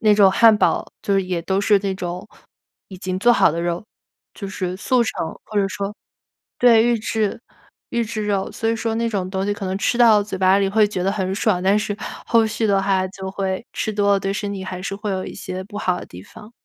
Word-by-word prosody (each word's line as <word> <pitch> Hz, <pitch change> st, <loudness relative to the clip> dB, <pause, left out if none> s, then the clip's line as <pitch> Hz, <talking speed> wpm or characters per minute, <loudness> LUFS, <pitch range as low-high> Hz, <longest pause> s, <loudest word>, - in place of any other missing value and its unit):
那 215 Hz, -4 st, +5 dB
种 200 Hz, -2 st, +6 dB
汉 225 Hz, +2 st, +6 dB
堡 -, -, +1 dB, 0.2 s
就 200 Hz, -, 0 dB
是 195 Hz, -, +2 dB
也 180 Hz, -2 st, -3 dB
都 190 Hz, +3 st, 0 dB
是 205 Hz, 0 st, +4 dB
那 195 Hz, -1 st, -2 dB
种 180 Hz, +2 st, -5 dB, 0.6 s
已 190 Hz, -, -9 dB
经 185 Hz, 0 st, -3 dB
做 240 Hz, +5 st, +5 dB
好 235 Hz, -, +4 dB
的 165 Hz, -, -2 dB
肉， 175 Hz, +2 st, -2 dB, 0.5 s
就 200 Hz, -, -6 dB
是 185 Hz, -2 st, -4 dB
速 245 Hz, +5 st, +2 dB
成， 220 Hz, -7 st, -3 dB, 0.2 s
或 215 Hz, -, -8 dB
者 200 Hz, -, +2 dB
说 200 Hz, +1 st, -4 dB, 0.6 s
对， 230 Hz, -2 st, +6 dB
预 240 Hz, -1 st, +2 dB
制 215 Hz, 0 st, -2 dB, 0.5 s
预 235 Hz, -, 0 dB
制 215 Hz, -1 st, -4 dB
肉。 200 Hz, -2 st, -1 dB
所 225 Hz, -, -4 dB
以 225 Hz, -, +2 dB
说 225 Hz, 0 st, -2 dB
那 230 Hz, 0 st, 0 dB
种 195 Hz, -5 st, -2 dB
东 190 Hz, 0 st, -2 dB
西， 205 Hz, -, +1 dB
可 205 Hz, -3 st, -5 dB
能 185 Hz, +1 st, -2 dB
吃 235 Hz, -, 0 dB
到 225 Hz, -4 st, +6 dB
嘴 205 Hz, -1 st, -6 dB
巴 190 Hz, +1 st, +4 dB
里 200 Hz, -1 st, +1 dB
会 215 Hz, +1 st, +4 dB
觉 185 Hz, -3 st, -3 dB
得 195 Hz, +2 st, +1 dB
很 190 Hz, -2 st, -2 dB
爽， 195 Hz, -3 st, +1 dB
但 195 Hz, +2 st, +3 dB
是 210 Hz, -1 st, -2 dB, 0.3 s
后 230 Hz, -1 st, +4 dB
续 220 Hz, +1 st, -1 dB
的 200 Hz, -2 st, +3 dB
话， 190 Hz, -1 st, +1 dB
就 190 Hz, 0 st, -7 dB
会 190 Hz, +3 st, -3 dB
吃 220 Hz, -, -2 dB
多 200 Hz, -1 st, +2 dB
了， 195 Hz, -, +2 dB
对 195 Hz, 0 st, -1 dB
身 205 Hz, 0 st, -3 dB
体 190 Hz, -1 st, -6 dB
还 185 Hz, -1 st, -6 dB
是 195 Hz, +1 st, -4 dB
会 210 Hz, 0 st, -4 dB
有 190 Hz, -1 st, -2 dB
一 -, -, -8 dB
些 185 Hz, +1 st, -6 dB
不 205 Hz, +1 st, -11 dB
好 180 Hz, -3 st, 0 dB
的 -, -, -9 dB
地 90 Hz, +1 st, -11 dB
方。 210 Hz, -, -14 dB
200 Hz, 265 characters per minute, -21 LUFS, 190-215 Hz, 0.6 s, 种